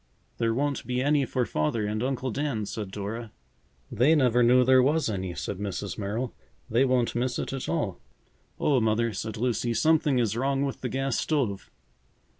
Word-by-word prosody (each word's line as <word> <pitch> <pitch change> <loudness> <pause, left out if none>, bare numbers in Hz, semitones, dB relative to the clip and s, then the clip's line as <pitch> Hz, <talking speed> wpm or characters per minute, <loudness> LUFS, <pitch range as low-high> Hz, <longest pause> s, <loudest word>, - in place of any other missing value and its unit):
"There 115 -1 +2
won't 140 +4 -1
be 125 0 -1
any 145 +1 +2
for 125 +1 0
Father 105 +8 -1
and 105 +1 -2
Uncle 130 0 -1
Dan," 130 -4 -2
said 105 -1 -5
Dora. 105 +3 -5 0.6
"They 140 +8 +4
never 125 -4 +3
knew 125 +1 +5
there 130 0 +6
was 150 +1 +2
any," 95 -3 -4
said 100 - -4
Mrs. 100 -2 -4
Merrill. 110 +5 -3 0.3
"They 120 +4 +3
won't 125 -2 +1
miss 125 +1 -1
it - - -3
at 135 - -4
all." 110 - -1 0.6
"Oh, 140 -3 +3
Mother!" 110 0 +1
said 110 +1 -5
Lucy, 120 0 0
"something 150 +1 +3
is 115 -3 +1
wrong 135 +3 0
with 135 - -5
the 125 - -2
gas 135 0 -1
stove." 125 -11 -1
120 Hz, 180 wpm, -27 LUFS, 110-135 Hz, 0.6 s, there